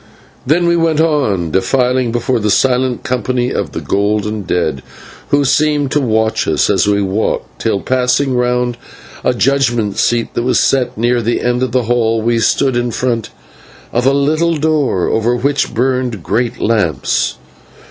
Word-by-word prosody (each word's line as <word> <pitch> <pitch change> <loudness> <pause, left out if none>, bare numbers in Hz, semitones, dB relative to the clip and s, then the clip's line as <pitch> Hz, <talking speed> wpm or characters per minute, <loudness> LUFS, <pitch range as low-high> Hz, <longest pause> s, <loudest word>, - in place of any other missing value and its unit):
Then 170 +5 +2
we 170 0 +3
went 165 -2 +1
on 130 - +1
defiling 125 - +1
before 120 +1 0
the 105 -1 -1
silent 130 +2 +1
company 125 0 -1
of 90 -8 -3
the - - -4
golden 105 +1 -1
dead, 85 -7 -1 0.5
who 145 0 +2
seemed 145 0 +1
to 150 - +1
watch 110 -3 0
us - - +2
as - - +2
we 100 0 +2
walked, 95 +3 -2
till, 100 - 0
passing 130 +1 +1
round 125 0 0 0.5
a - - +2
judgment 120 -6 +1
seat 120 -1 0
that - - -1
was 125 +2 +1
set 130 -5 +1
near 120 +2 +1
the 115 +1 -1
end 125 0 0
of 130 -2 -1
the 125 0 +1
hall, 115 -1 +1
we 115 +1 0
stood 130 +4 +1
in 120 0 0
front 120 -1 -2 0.6
of 120 +2 +1
a - - +5
little 155 +4 +1
door 150 - 0
over 115 +2 +1
which 140 +4 0
burned 125 -5 -1
great 120 +4 -1
lamps. 100 -11 0
125 Hz, 165 wpm, -15 LUFS, 110-135 Hz, 0.6 s, a